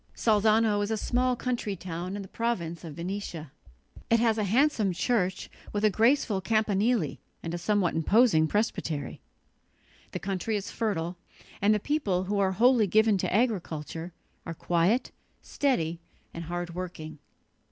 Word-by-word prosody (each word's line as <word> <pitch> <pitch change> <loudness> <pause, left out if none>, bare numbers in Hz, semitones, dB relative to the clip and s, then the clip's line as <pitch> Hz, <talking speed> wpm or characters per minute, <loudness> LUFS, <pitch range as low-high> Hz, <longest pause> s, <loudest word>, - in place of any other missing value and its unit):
Salzano 215 -1 +3
is 205 - -1
a 220 - 0
small 250 +3 +1
country 240 -5 -2
town 180 +1 -5
in 205 - -5
the - - -10
province 180 -8 -3
of 160 -4 -8
Venetia. 170 -4 -5 0.6
It 230 - +4
has 225 -1 +2
a 210 - +1
handsome 225 -2 +2
church 190 -1 0 0.3
with 210 +1 +1
a 215 - +4
graceful 225 -1 +2
campanile 215 - +1 0.3
and 165 - -4
a 175 - -3
somewhat 200 -2 +1
imposing 165 0 +4
presbytery. 165 -7 -2 0.9
The - - -3
country 195 +3 -2
is 205 -1 -4
fertile, 180 -6 -2 0.4
and 200 +2 +4
the 215 - +3
people, 205 -9 0
who 200 +2 -1
are 190 -1 +2
wholly 235 +1 +4
given 215 +1 +3
to - - -1
agriculture, 175 -7 -1 0.3
are 165 - -6
quiet, 175 +9 +1 0.3
steady 170 - 0 0.3
and 170 0 -6
hard 175 +1 -4
working. 165 -4 -7
200 Hz, 150 wpm, -28 LUFS, 175-225 Hz, 0.9 s, It